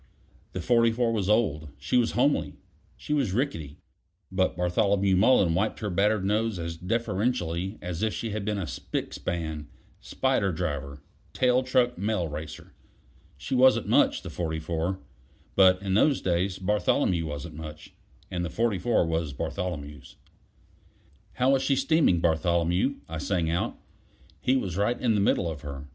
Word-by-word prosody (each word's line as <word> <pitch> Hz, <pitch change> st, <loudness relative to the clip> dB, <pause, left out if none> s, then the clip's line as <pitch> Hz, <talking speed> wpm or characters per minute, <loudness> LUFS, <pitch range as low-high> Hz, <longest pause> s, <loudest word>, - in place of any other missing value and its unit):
The 95 Hz, -, -3 dB
44 115 Hz, +2 st, +2 dB
was 100 Hz, -3 st, -1 dB
old; 80 Hz, -9 st, +1 dB
she 70 Hz, -, -3 dB
was 120 Hz, -2 st, +3 dB
homely; 140 Hz, +4 st, +1 dB, 0.4 s
she 150 Hz, -, -4 dB
was 135 Hz, -10 st, +1 dB
rickety; 85 Hz, -, -2 dB, 0.5 s
but 95 Hz, -1 st, 0 dB
Bartholomew 95 Hz, +2 st, +2 dB
Mullen 95 Hz, -3 st, +4 dB
wiped 100 Hz, +6 st, 0 dB
her 105 Hz, -2 st, -2 dB
battered 100 Hz, +2 st, +2 dB
nose 110 Hz, +1 st, 0 dB
as 85 Hz, -1 st, -4 dB
deferentially 95 Hz, -2 st, -1 dB
as 90 Hz, 0 st, -4 dB
if 110 Hz, 0 st, +1 dB
she 115 Hz, 0 st, -4 dB
had 105 Hz, 0 st, -3 dB
been 105 Hz, 0 st, -1 dB
a 95 Hz, -, -2 dB
spick -, -, -4 dB
span, 80 Hz, -4 st, -4 dB, 0.3 s
spider 130 Hz, -7 st, 0 dB
driver, 70 Hz, -4 st, -4 dB, 0.3 s
tail 125 Hz, 0 st, +3 dB
truck 125 Hz, -1 st, +1 dB
mail 100 Hz, -4 st, 0 dB
racer. 75 Hz, +1 st, -8 dB, 0.6 s
She 75 Hz, -, -5 dB
wasn't 130 Hz, 0 st, +4 dB
much -, -, +3 dB
the -, -, -7 dB
44. 80 Hz, +2 st, -2 dB, 0.6 s
But 95 Hz, -1 st, +6 dB
in 95 Hz, -1 st, -1 dB
those 135 Hz, +7 st, +4 dB
days 90 Hz, +1 st, 0 dB
Bartholomew 95 Hz, -3 st, +1 dB
wasn't 75 Hz, -2 st, -6 dB
much: 75 Hz, 0 st, -9 dB, 0.4 s
and 90 Hz, -2 st, -2 dB
the 85 Hz, -, -3 dB
44 110 Hz, 0 st, +1 dB
was 80 Hz, -3 st, -2 dB
Bartholomew's. 75 Hz, -2 st, -5 dB, 1.2 s
"How 130 Hz, +2 st, +2 dB
is 135 Hz, -, +2 dB
she 135 Hz, -, +2 dB
steaming, 135 Hz, -, +3 dB
Bartholomew?" 85 Hz, -, +1 dB
I 80 Hz, 0 st, -5 dB
sang 85 Hz, -1 st, 0 dB
out; 85 Hz, -, -1 dB, 0.6 s
he 130 Hz, -, +2 dB
was 95 Hz, -8 st, -3 dB
right 110 Hz, +4 st, +1 dB
in 120 Hz, -3 st, +2 dB
the 105 Hz, -, +2 dB
middle 95 Hz, -3 st, +2 dB
of 80 Hz, -3 st, -5 dB
her. 70 Hz, -2 st, -7 dB
95 Hz, 155 wpm, -27 LUFS, 80-115 Hz, 1.2 s, But